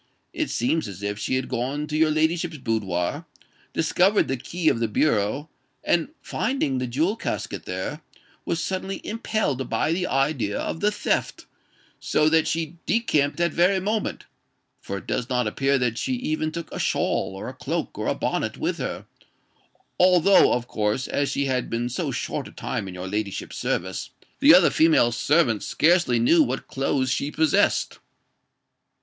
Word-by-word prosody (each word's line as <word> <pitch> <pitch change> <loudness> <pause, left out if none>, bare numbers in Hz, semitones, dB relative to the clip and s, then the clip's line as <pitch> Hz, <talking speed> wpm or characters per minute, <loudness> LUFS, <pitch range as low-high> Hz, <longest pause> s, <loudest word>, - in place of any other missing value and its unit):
It - - -2
seems 140 +4 0
as 100 0 -9
if 105 0 -3
she 130 - -1
had 130 0 -1
gone 130 +4 -2
to 150 0 -5
your 155 0 +4
ladyship's 160 +1 0
boudoir, 110 - -2 0.4
discovered 180 +6 +2
the 135 - 0
key 160 +7 -4
of 115 - +3
the 115 - +1
bureau, 115 +3 +1 0.4
and 170 +7 +1
finding 145 - -1
the 125 - -2
jewel 160 - 0
casket - - -4
there, 95 - -4 0.4
was 165 - -2
suddenly 190 +3 -3
impelled 210 - -2
by - - 0
the 180 +2 0
idea 135 -6 0
of - - -3
the 205 - +3
theft; - - -2 0.5
so 150 0 +2
that 160 0 +3
she 165 +1 -3
decamped 150 -11 +1
that 170 -1 +1
very 185 +3 +3
moment—for 205 - -5
it - - -9
does 125 +1 -2
not 125 -2 +1
appear 135 +6 +1
that 120 -3 -1
she 260 - -1
even 155 -10 -1
took 170 -1 -6
a - - -5
shawl, 95 - 0
or 95 - -6
a - - -6
cloak, - - -3
or - - -3
a - - +1
bonnet - - -2
with - - -2
her; - - -4 0.9
although, 180 +1 +6
of 120 0 -2
course, 110 +4 -1
as 140 -1 0
she 140 - -1
had 130 -2 -1
been 115 +1 -1
so 125 - -2
short - - -3
a - - -12
time - - -4
in 90 - -8
your 90 +1 -6
ladyship's 100 0 -4
service, 95 +1 -2 0.3
the - - +7
other - - +7
female 160 -7 +4
servants 120 -2 +2
scarcely 170 -6 +3
knew 140 +9 +5
what 130 -2 -1
clothes 135 -1 0
she 140 - -1
possessed." 155 0 +1
145 Hz, 170 wpm, -24 LUFS, 120-165 Hz, 0.9 s, the